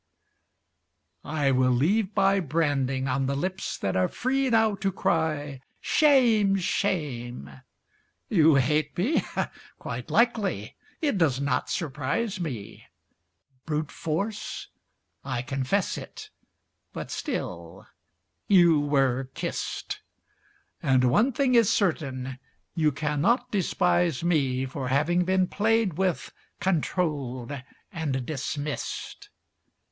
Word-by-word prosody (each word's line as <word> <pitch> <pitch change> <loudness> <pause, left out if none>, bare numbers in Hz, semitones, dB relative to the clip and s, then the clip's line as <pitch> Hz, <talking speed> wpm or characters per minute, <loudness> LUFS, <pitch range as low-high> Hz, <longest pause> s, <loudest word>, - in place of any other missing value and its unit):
I 145 -2 0
will 130 -1 +3
leave 190 - +1
my 195 +1 +4
branding 140 -5 0
On 135 +1 0
the 140 - 0
lips 185 +6 -3
that 95 - -2
are 90 -1 +3
free 265 +2 0
now 220 -2 +3
to 195 0 0
cry 155 -6 -1 0.2
"Shame, 235 -10 +4
shame!" 145 - -2 0.8
You 160 -6 +5
hate 145 +2 +1
me? 235 - +2 0.6
Quite - - -6
likely! 205 - +1 0.3
It 285 - +1
does 140 -6 +2
not 140 -2 0
surprise 160 - -2
me, 130 - -6 0.8
Brute 150 -1 -2
force? 200 +7 -3 0.5
I 130 -3 -3
confess 135 +9 -1
it; 425 0 -10 0.6
but - - -6
still - - -5 0.6
you 175 -5 +6
were 135 -3 +1
kissed; - - -4 0.8
And 130 -2 +3
one 225 - +4
thing 265 0 +1
is 230 -4 +5
certain 130 -9 -1 0.3
you 155 -3 +2
cannot 150 - 0
despise 175 -5 +1
me 135 -7 +1
For 130 0 -5
having 165 +7 +2
been 185 0 +3
played 220 0 +1
with, 185 -3 0 0.3
controlled, 145 -8 -1 0.4
and 140 -7 -2
dismissed. 145 0 -4
155 Hz, 105 wpm, -26 LUFS, 135-195 Hz, 0.8 s, you